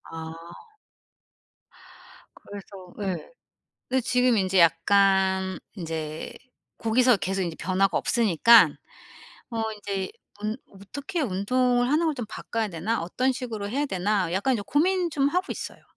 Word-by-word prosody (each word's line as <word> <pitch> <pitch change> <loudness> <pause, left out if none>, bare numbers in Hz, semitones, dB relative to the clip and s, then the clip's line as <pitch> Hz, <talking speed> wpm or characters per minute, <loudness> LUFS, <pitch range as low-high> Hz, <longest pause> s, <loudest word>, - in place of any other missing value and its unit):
아. 160 0 -6 2.0
그래서 195 -2 -11
예 190 - -4 0.6
근데 260 +1 +1
지금 250 0 +2
인제 190 -1 +1
약간 190 +2 +3 0.2
인제 160 -4 -5 0.5
고기서 240 +2 +3
계속 190 +1 -2
인제 170 -3 -4
변화가 190 +1 +1
없으니까 230 +1 +5 0.8
어 225 -1 -2
인제 200 -2 -4 0.3
운 215 +1 -2
'어떻게 280 - -6
운동을 245 +2 +1
하는 315 +3 +2
걸 315 - 0
좀 250 -4 -4
바꿔야 225 0 -3
되나. 195 +6 -2
어떤 255 +10 0
식으로 230 -5 -5
해야 280 +7 -1
되나.' 190 -4 0
약간 200 +9 +1
인제 215 - -2
고민 355 +3 +1
좀 280 -2 +1
하고 360 +5 0
있어요. - - -8
210 Hz, 260 characters per minute, -26 LUFS, 190-250 Hz, 2.0 s, 없으니까